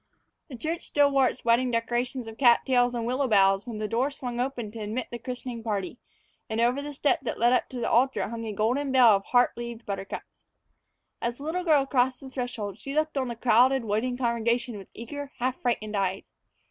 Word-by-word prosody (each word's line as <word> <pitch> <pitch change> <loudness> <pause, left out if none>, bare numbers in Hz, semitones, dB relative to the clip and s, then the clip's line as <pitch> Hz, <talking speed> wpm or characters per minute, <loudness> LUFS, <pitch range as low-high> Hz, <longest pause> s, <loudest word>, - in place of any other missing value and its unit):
The 260 - -9
church 325 +7 -3
still 285 -1 +3
wore 270 -2 +4
its 250 - -5
wedding 240 +2 +3
decorations 240 +1 -1
of 225 0 -10
cat 240 -3 +6
tails 245 -2 +2
and 230 -1 -2
willow 260 +3 0
boughs 195 -1 +3
when 230 -3 -5
the 215 0 -2
door 240 +5 +1
swung 245 -4 -6
open 245 -4 -3
to 225 - -9
admit 220 +4 -4
the 240 - -5
christening 245 0 -6
party, 210 0 -3 0.5
and 220 +1 -2
over 245 +4 +2
the 290 +1 -6
step 290 0 +1
that 245 - -4
led 240 +2 +4
up - - +1
to 255 - -6
the 230 - -1
altar 260 +3 +2
hung 230 +1 -6
a - - -3
golden 245 +7 0
bell 255 -3 +7
of 195 - -3
heart 245 0 +3
leaved 235 -1 -7
buttercups. 195 -1 -6 0.8
As 235 0 -2
the 280 - -10
little 340 +4 -2
girl 300 -5 +4
crossed 260 -1 +1
the 270 -2 -11
threshold, 225 -6 -4
she 275 +6 -6
looked 310 0 0
on 265 -2 0
the 235 - -4
crowded, 245 +2 +3
waiting 225 +4 -1
congregation 235 -1 0
with 195 -2 -9
eager, 285 +4 -7
half 255 +1 -2
frightened 215 -4 -1
eyes. 195 -1 -2
245 Hz, 215 wpm, -27 LUFS, 225-260 Hz, 0.8 s, bell